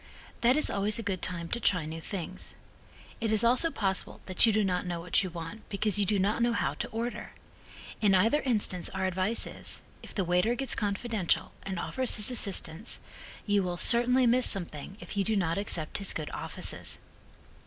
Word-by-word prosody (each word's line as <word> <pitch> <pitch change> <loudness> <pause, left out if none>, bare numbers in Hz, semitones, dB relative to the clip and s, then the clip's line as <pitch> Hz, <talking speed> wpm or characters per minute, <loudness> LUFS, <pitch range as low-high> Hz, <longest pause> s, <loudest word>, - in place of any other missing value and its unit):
That 245 +2 +4
is 305 - +2
always 205 +1 +3
a 230 - -3
good 190 -3 -2
time 170 -2 -3
to 235 - -1
try 180 -7 +1
new 160 +1 -6
things. 185 0 -6 0.6
It 225 -2 -1
is 220 +1 +2
also 250 +8 +5
possible 195 -9 -3
that 185 +4 +5
you - - +5
do 215 0 +2
not 180 -2 -1
know 175 -1 -3
what 170 +1 +1
you 190 - -3
want 170 +5 -8
because 205 0 +1
you 200 - +1
do 210 - +2
not 200 +4 +1
know 235 0 +2
how - - 0
to - - -4
order. 235 +2 -5 0.7
In 200 -3 +4
either 225 +11 +3
instance 210 -8 +1
our 190 0 -1
advice 185 +5 +1
is, - - -2 0.2
if - - -11
the 195 - 0
waiter 180 +7 +2
gets 265 0 -2
confidential 205 -2 -1
and 190 -2 -5
offers 255 +8 +1
his 210 +3 +3
assistance 200 -4 -1 0.5
you 205 -1 +2
will 180 -2 -3
certainly 245 +5 +5
miss 245 +2 +4
something 175 -1 -3
if - - -8
you 200 - +1
do 220 +2 0
not 180 -2 0
accept 170 -5 -1
his 200 - -2
good 155 -2 -4
offices. - - -2
200 Hz, 195 wpm, -29 LUFS, 180-230 Hz, 0.7 s, also